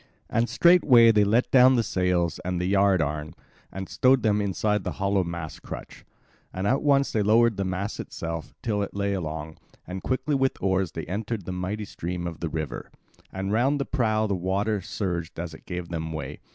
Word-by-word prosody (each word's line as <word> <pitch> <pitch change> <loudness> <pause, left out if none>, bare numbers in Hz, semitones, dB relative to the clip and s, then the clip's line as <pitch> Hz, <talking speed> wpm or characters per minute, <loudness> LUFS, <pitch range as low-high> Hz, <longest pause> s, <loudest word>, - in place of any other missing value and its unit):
And 115 +1 +1
straightway 135 -10 +6
they 105 -2 +4
let 110 +5 +2
down 130 0 +7
the 115 - +2
sails 90 -4 0
and 90 0 -2
the 90 - -1
yard 95 -2 +3
arm 75 +1 -4 0.4
and 95 0 -6
stowed 130 -1 +3
them 105 -1 +2
inside 105 +1 0
the - - -3
hollow 100 -1 +1
mast 85 -2 -6
crutch, - - -9 0.5
and 95 +1 -4
at 130 +7 +2
once 140 -1 +3
they 110 - +1
lowered 110 +2 +4
the 100 - -2
mast 95 +2 -3
itself 80 -1 -6
till 105 -4 0
it 100 - -4
lay 100 0 0
along; 80 -4 -5 0.3
and 95 +1 -6
quickly 130 +3 -1
with 135 -1 +1
oars 95 -3 0
they 80 - -5
entered 105 +1 -4
the - - -4
mighty 95 +4 -3
stream 90 -2 -5
of 85 -2 -5
the 85 - -3
river; 80 -1 -5 0.4
and 95 +1 -3
round 130 +6 +2
the 140 - -1
prow 110 -5 +1
the 100 - -1
water 100 +3 -1
surged 85 -4 -4
as 85 -1 -5
it - - -14
gave 90 -2 -5
them 80 -1 -4
way. 75 -2 -6
95 Hz, 200 wpm, -26 LUFS, 85-110 Hz, 0.5 s, down